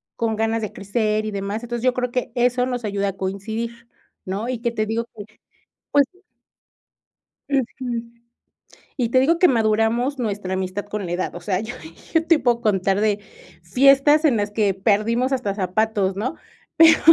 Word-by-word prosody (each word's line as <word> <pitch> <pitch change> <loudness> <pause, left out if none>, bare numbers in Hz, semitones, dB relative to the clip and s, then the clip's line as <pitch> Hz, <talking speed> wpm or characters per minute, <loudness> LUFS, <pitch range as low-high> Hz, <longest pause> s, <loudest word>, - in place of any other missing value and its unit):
con 225 -1 -1
ganas 225 +1 0
de 215 - -4
crecer 215 +1 -1
y 215 - -3
demás. 200 +2 -3
Entonces, 240 0 -4
yo 255 -1 +3
creo 250 -1 -1
que 250 -2 -2
eso 250 0 +2
nos 245 -2 -3
ayuda 200 -1 -1
a 195 - -8
coincidir, 220 +5 -4 0.4
¿no? 195 +5 -3
Y 255 -2 -2
que 235 0 -1
te 215 -2 -1
digo 225 +2 -2
que, 205 -2 -9 0.7
pues 285 -1 +5 1.4
Ujú. 250 -3 -2 0.9
Y 240 -4 0
te 255 - +4
digo 325 +6 +3
que 360 - +7
maduramos 230 +2 +1
nuestra 205 -5 -2
amistad 190 +2 -3
con 205 -1 -4
la 170 - -5
edad, 180 0 -2
o - - -5
sea, 185 +1 -1
yo 220 +2 -6 0.4
yo 325 -1 +3
te 330 -1 +5
puedo 240 -2 +2
contar 195 -3 +1
de 210 -1 +1 0.4
fiestas 275 - +5
en 265 -7 +4
las 205 0 -1
que 210 -2 +1
perdimos 220 +6 +1
hasta 245 -7 -1
zapatos, 200 0 0
¿no? 245 +10 -3 0.4
Pero, 325 0 +7
225 Hz, 175 wpm, -22 LUFS, 200-250 Hz, 1.4 s, que